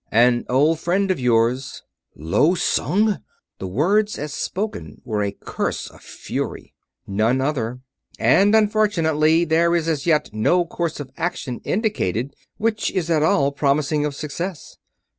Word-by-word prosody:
"An 120 +2 +3
old 150 +5 +3
friend 190 +3 +1
of 185 - -1
yours...." 125 +1 +1 0.3
"Lo 100 - +2
Sung!" 205 +3 +1 0.4
The 95 - -4
words 200 - +1
as 150 0 -5
spoken 210 +8 -4
were 110 -4 -1
a 100 -1 -1
curse - - -4
of - - -18
fury. - - -6 0.3
"None 110 +6 +1
other. 125 -3 -2 0.4
And, 205 +2 +4
unfortunately, 170 -7 +3
there 170 +1 +2
is 165 -1 0
as 155 -1 -1
yet 155 -2 +2
no 175 +12 +2
course 170 -1 -3
of 135 -3 -7
action 135 -7 -3
indicated 140 - -1 0.2
which 220 -1 0
is 170 -3 -2
at 155 -2 +3
all 140 -2 +3
promising 145 +1 +1
of 150 -2 -2
success." 160 +5 -6
155 Hz, 140 wpm, -21 LUFS, 125-180 Hz, 0.4 s, And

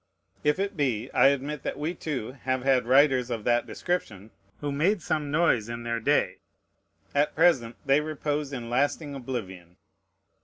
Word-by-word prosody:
If 150 +2 +2
it 200 +1 -2
be, 130 -6 -1
I - - +5
admit 140 +1 0
that - - -4
we, 155 +4 -2
too, 140 -9 -4
have 130 -1 -3
had 130 -3 +2
writers 130 -1 +4
of 115 -3 -3
that 120 +1 +2
description, 110 - -3 0.3
who 145 -1 -3
made 170 +6 +1
some 150 -2 -1
noise 140 -8 +2
in 115 0 -5
their 115 0 -2
day. 110 - +1 0.7
At 145 +1 +1
present 120 -9 +3
they 140 +2 +4
repose 150 -1 -3
in 120 -4 -5
lasting 145 +4 0
oblivion. 95 -10 -6
135 Hz, 160 wpm, -27 LUFS, 120-150 Hz, 0.7 s, I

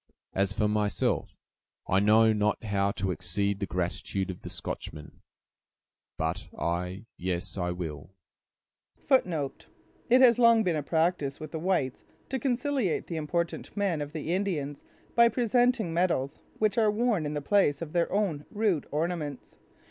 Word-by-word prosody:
As 100 +1 +2
for 105 +1 +1
myself, 105 -1 0 0.5
I 95 - +3
know 110 +2 +5
not 105 +1 0
how 100 -2 +1
to 95 -1 -1
exceed 100 +4 -1
the 100 - -2
gratitude 90 +2 -2
of 90 - -11
the - - -7
Scotchman, 75 -1 -6 1.0
but 80 0 -2
I—yes, 90 +1 -3
I 90 -3 -1
will—" 80 -4 -5 1.0
It 170 - +1 0.6
has 245 -2 +6
long 230 -2 +6
been 175 -4 +1
a 150 - 0
practice 160 -2 0
with 155 -1 -7
the 160 - -4
whites 170 -7 0 0.3
to 265 - -1
conciliate 255 - 0
the 165 - -4
important 170 +5 -3
men 190 -7 0
of 145 +1 -5
the 160 +1 -2
Indians 160 -8 -2 0.3
by 235 0 +6
presenting 240 -4 +2
medals, 165 -5 0 0.2
which 215 +1 +2
are 220 -2 +4
worn 210 -7 +1
in 150 - -4
the - - 0
place 145 -2 +2
of 160 -2 -6
their 170 -1 +1
own 185 -8 -1
rude 205 -7 0
ornaments. 155 -3 -3
150 Hz, 150 wpm, -28 LUFS, -, 1.0 s, has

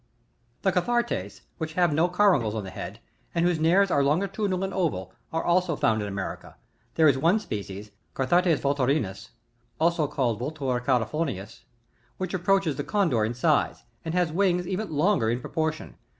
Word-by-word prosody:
20. 190 - +2
The 180 - +3
Cathartes, 235 - -2 0.2
which 160 0 -4
have 175 -2 +2
no 165 +4 +2
caruncles 175 - +3
on 110 - -3
the 95 - -7
head, 95 +6 -7 0.4
and 170 0 +2
whose 175 -2 +1
nares 180 +5 +4
are 140 - +3
longitudinal 190 +5 0
and 195 0 -3
oval, 155 - -2 0.2
are 165 - -1
also 175 -1 +2
found 110 -5 +1
in 105 - -3
America; 100 -1 -6 0.4
there 160 -1 +5
is 135 -2 +3
one 170 +8 +4
species 105 - -6
( - - -43
Cathartes 170 +4 +2
Vulturinus, 140 -6 0 0.5
also 165 -1 +2
called 120 -6 -1
Vultur 130 -2 -2
Califartiianiis,) 125 - -2 0.5
wliich 185 -1 -3
approaches 190 -2 +2
to - - -13
the 145 - -2
Condor 165 - +2
in 115 +3 -1
size, 125 - +1 0.2
and 165 +1 -3
has 175 -3 +2
wings, 180 0 +1
even 195 +3 -3
longer, 155 - +2
in 120 +2 0
proportion. 155 +4 -3
160 Hz, 175 wpm, -26 LUFS, 125-180 Hz, 0.5 s, there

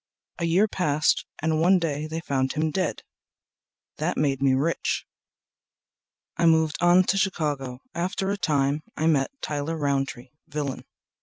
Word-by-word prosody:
A 170 - 0
year 180 +6 +3
passed 155 -6 +1 0.2
and 160 0 +1
one 185 +3 +5
day 155 -3 -2
they 160 +1 -4
found 135 -3 -1
him 155 0 0
dead. 185 -1 -2 0.9
That - - -1
made 135 -3 +1
me 135 -1 +4
rich. 155 +5 0 1.3
I 170 - +3
moved 160 -1 +3
on 175 +1 +6
to 195 +2 +1
Chicago. 145 -9 -1
After 185 +3 -1
a - - 0
time 145 -2 +1 0.2
met 155 -4 +2
Tyler 150 +2 -2
Rountree, 135 -4 -2 0.2
villain. 145 -2 -4
155 Hz, 140 wpm, -25 LUFS, 140-170 Hz, 1.3 s, on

